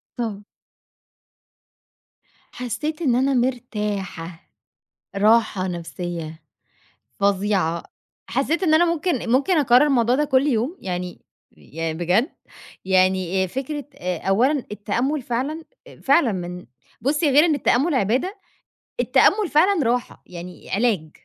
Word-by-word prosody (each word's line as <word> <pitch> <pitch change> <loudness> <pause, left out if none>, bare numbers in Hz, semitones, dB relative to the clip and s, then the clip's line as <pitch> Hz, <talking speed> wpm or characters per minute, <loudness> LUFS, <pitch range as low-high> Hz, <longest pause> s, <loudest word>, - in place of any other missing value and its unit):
طب 215 -4 -4 2.1
حسيت 300 +6 -4
إن 260 -7 +2
أنا 270 +2 +2
مرتاحة، 210 -9 -3 0.7
راحة 210 -2 +3
نفسيّة، 170 -2 -6 0.8
فظيعة، 195 -4 +1 0.5
حسّيت 295 +8 0
إن 315 -3 +3
أنا 345 +2 +5
ممكن 300 -8 -2
ممكن 295 +7 +3
أكرر 255 +1 +5
الموضوع 245 -3 +2
ده 295 +3 +2
كُلّ 275 0 +2
يوم، 260 +6 0
يعني 180 -1 -5 0.3
يعني 160 - -5
بجد 180 - +2 0.6
يعني 185 0 +2
آآ، - - -2
فكرة 275 - -5
آآ، 180 0 -3
أولًا 255 +8 +2
التأمل 245 +8 -1
فعلًا، 270 +7 -3 0.4
فعلًا 275 -4 +3
من 180 -1 -6 0.3
بُصّي 295 +3 +1
غير 295 +4 +6
إن 320 -3 +2
التأمل 285 +3 +1
عبادة، 255 - 0 0.6
التأمل 410 -3 +3
فعلًا 335 +2 +3
راحة، 240 +1 -2
يعني 180 0 -10
علاج، 195 -7 0
235 Hz, 115 wpm, -22 LUFS, 185-285 Hz, 2.1 s, غير